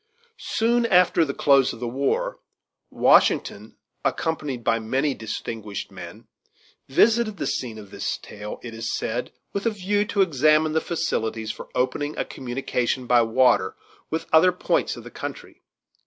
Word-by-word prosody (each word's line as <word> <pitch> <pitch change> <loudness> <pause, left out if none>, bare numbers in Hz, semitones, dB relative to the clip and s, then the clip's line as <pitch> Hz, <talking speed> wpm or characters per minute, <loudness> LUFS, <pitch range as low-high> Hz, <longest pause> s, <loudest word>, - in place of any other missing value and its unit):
Soon 235 +1 +1
after 180 -4 +4
the 140 -3 -2
close 140 -2 +4
of 115 - -10
the 120 - -3
war, 455 - -1 0.5
Washington, - - +3 0.3
accompanied 150 -7 -2
by 115 0 +2
many 135 +6 0
distinguished 110 -2 -6
men, - - -10 0.6
visited 215 - +3
the - - -3
scene 115 -4 -3
of 100 -2 -11
this - - -3
tale, 105 0 -8
it 120 -2 -7
is 115 0 -3
said 120 +2 -3 0.2
with 200 +3 -1
a - - +5
view 205 0 0
to 205 -2 +2
examine 155 -1 +3
the 160 - +2
facilities 110 -9 -2
for - - -10
opening 145 +4 -1
a - - -1
communication 125 0 -2
by 120 0 +5
water 115 -4 +3 0.3
with 160 - -2
other 170 +3 +7
points 180 - 0
of - - -9
the - - -11
country. - - -8
135 Hz, 155 wpm, -24 LUFS, 115-180 Hz, 0.6 s, other